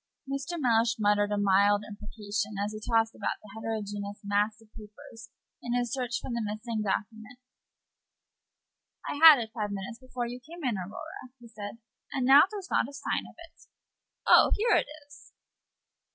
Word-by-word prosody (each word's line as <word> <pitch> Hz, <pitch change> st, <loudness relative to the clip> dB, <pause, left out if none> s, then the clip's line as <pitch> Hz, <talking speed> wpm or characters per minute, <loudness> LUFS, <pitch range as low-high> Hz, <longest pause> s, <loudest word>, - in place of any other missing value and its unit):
I'm 275 Hz, -, -5 dB
afraid 275 Hz, +3 st, -4 dB
that 345 Hz, -, -3 dB
Mr. -, -, -5 dB
Mellish 230 Hz, -2 st, +3 dB
muttered 205 Hz, -1 st, +2 dB
an 205 Hz, 0 st, 0 dB
oath 200 Hz, +2 st, +4 dB, 0.2 s
as 210 Hz, -1 st, -4 dB
he 215 Hz, -, -6 dB
tossed 225 Hz, -1 st, +2 dB
about -, -, -3 dB
the 210 Hz, -, -13 dB
heterogeneous 205 Hz, -2 st, -5 dB
mass 205 Hz, +2 st, 0 dB
of 220 Hz, -1 st, -22 dB
papers 220 Hz, +1 st, -13 dB, 0.3 s
in 240 Hz, 0 st, -2 dB
his 245 Hz, 0 st, -1 dB
search 245 Hz, -2 st, -2 dB
for -, -, -7 dB
the 235 Hz, 0 st, -2 dB
missing 215 Hz, +2 st, -4 dB
document. 220 Hz, +3 st, -4 dB, 1.7 s
"I -, -, -3 dB
had 315 Hz, -3 st, +11 dB
it 225 Hz, -3 st, -4 dB
five 210 Hz, -3 st, -3 dB
minutes 200 Hz, +4 st, -6 dB
before 255 Hz, -2 st, -5 dB
you 245 Hz, +1 st, -6 dB
came 325 Hz, +6 st, -12 dB
in, 245 Hz, -5 st, 0 dB
Aurora," 250 Hz, -, -8 dB
he 240 Hz, -, -14 dB
said, 210 Hz, -1 st, -8 dB, 0.3 s
"and 260 Hz, -2 st, -1 dB
now 275 Hz, +3 st, +8 dB
there's 405 Hz, -3 st, -8 dB
not -, -, +1 dB
a -, -, -13 dB
sign 280 Hz, 0 st, -3 dB
of -, -, -18 dB
it 330 Hz, 0 st, -23 dB, 0.6 s
oh, -, -, +7 dB
here 440 Hz, +1 st, +3 dB
it -, -, +2 dB, 0.2 s
is!" 290 Hz, 0 st, -17 dB
225 Hz, 180 wpm, -28 LUFS, 210-255 Hz, 1.7 s, had